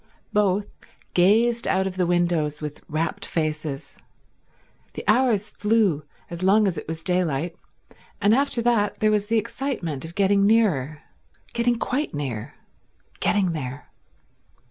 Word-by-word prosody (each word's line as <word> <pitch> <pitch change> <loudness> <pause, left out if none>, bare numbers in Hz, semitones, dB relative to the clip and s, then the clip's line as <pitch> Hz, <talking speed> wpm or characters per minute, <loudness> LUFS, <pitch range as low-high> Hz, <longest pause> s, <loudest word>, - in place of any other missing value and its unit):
Both 205 -1 +2 0.5
gazed 225 +6 +3
out 190 0 +2
of 190 -1 -3
the 180 -2 +1
windows 170 -4 +1
with 150 -1 -7
rapt 155 +2 -2
faces. 155 -3 -3 1.0
The - - -6
hours 215 -2 +3
flew 205 -8 +1 0.2
as 170 0 -7
long 205 +3 +4
as 190 -3 0
it 150 - -7
was 160 0 -5
daylight, 175 -3 0 0.6
and 205 - +4
after 255 -2 +1
that 225 -4 +1
there 215 0 +3
was 210 -1 +1
the 225 +1 +2
excitement 215 - -3
of 165 +1 -9
getting 200 0 +3
nearer, 160 - +2 0.5
getting 235 0 +2
quite 260 - -2
near, 130 -7 -4 0.6
getting 195 -4 +2
there. 140 -3 -6
190 Hz, 135 wpm, -24 LUFS, 155-215 Hz, 1.0 s, long